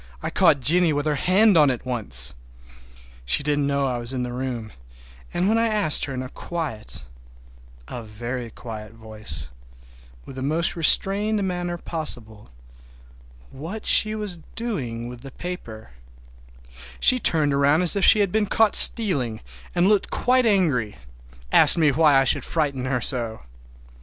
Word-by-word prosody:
I - - -3
caught 140 - +3
Jennie 165 +4 +3
with 145 0 -2
her 155 - 0
hand 190 +8 +3
on 150 -3 +5
it 125 -1 -4
once. 105 - -2 0.9
She 60 - 0
didn't 145 -1 -1
know 140 0 0
I 125 -2 -2
was 120 +2 -3
in 125 -1 -3
the 120 0 -5
room, 125 -4 -5 0.6
and 180 +2 -1
when 225 +2 +2
I 230 - +1
asked 210 -8 +1
her 135 - -7
in 130 - -4
a 130 - -8
quiet, 150 -12 -6 0.8
a 125 - -7
very 120 +3 -7
quiet 110 -2 -10
voice, 110 - -4 0.8
with 135 - -11
the - - -5
most 155 +5 -1
restrained 200 +5 +1
manner 175 -1 -4
possible, 120 - -5 1.0
what 170 +11 -8
she 215 0 +3
was 205 -5 -5 0.2
doing 130 - -5
with 120 -1 -10
the 135 - -10
paper 125 - -9 1.1
she 255 - +5
turned 155 -9 +2
around 140 +4 +2
as 180 - +1
if 200 - -1
she 215 - +6
had 200 -3 0
been 215 0 0
caught 220 0 +2
stealing, 140 - +5 0.4
and 175 +2 +2
looked 205 -1 +1
quite 255 -1 +1
angry—asked 65 - +1
me 155 -3 +3
why 150 0 +3
I - - +3
should 130 - 0
frighten 140 -5 -2
her 130 -2 -2
so! 115 - 0
140 Hz, 155 wpm, -22 LUFS, 120-180 Hz, 1.1 s, she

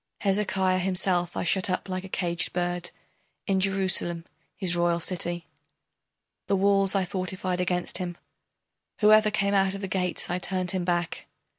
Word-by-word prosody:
Hezekiah 190 -2 +1
himself 180 -1 0
I - - 0
shut 185 +2 +2
up 185 - -1
like 185 -1 -3
a 190 - -9
caged 170 -2 -1
bird 175 0 -1 0.6
In 195 -2 +1
Jerusalem, 185 -3 +1 0.3
his 180 -4 +1
royal 170 0 +2
city, 175 -1 -1 1.0
The 200 - +2
walls 195 0 +2
I 195 -1 +2
fortified 185 0 -3
against 180 0 0
him, 175 -2 -4 0.8
Whoever 215 0 +6
came 200 -1 0
out 195 -1 +2
of 195 - -6
the 195 - -3
gates 180 -1 -1
I 175 +1 -2
turned 185 -1 -1
him 185 -2 -2
back. 175 -1 -2
185 Hz, 155 wpm, -27 LUFS, 175-195 Hz, 1.0 s, Whoever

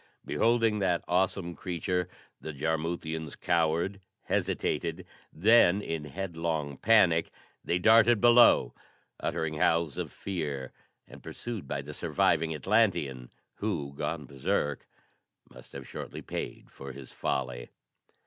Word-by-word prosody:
Beholding 115 -2 +2
that 90 -3 +1
awesome 90 -1 0
creature 90 0 -2 0.3
the 80 - -7
Jarmuthians 80 +1 -3
cowered, 85 +4 0 0.2
hesitated; 85 +2 -1 0.3
then 100 +1 +5
in 80 -6 -4
headlong 80 -4 -3
panic 95 -6 +4 0.3
they 85 - 0
darted 110 +4 +5
below, 120 - +6 0.5
uttering 80 -1 -2
howls 80 -5 +2
of - - -4
fear 75 -9 -4 0.4
and - - -13
pursued 115 - -6
by 70 0 -3
the 75 +2 -8
surviving 80 +2 +1
Atlantean, 80 - +1 0.3
who, 80 -10 -3
gone 75 +1 -3
berserk, 70 +1 -2 0.6
must - - -15
have 70 -1 -8
shortly - - -7
paid - - -6
for 70 -1 -9
his 65 -1 -10
folly. 65 -2 -3
85 Hz, 115 wpm, -29 LUFS, 75-95 Hz, 0.6 s, below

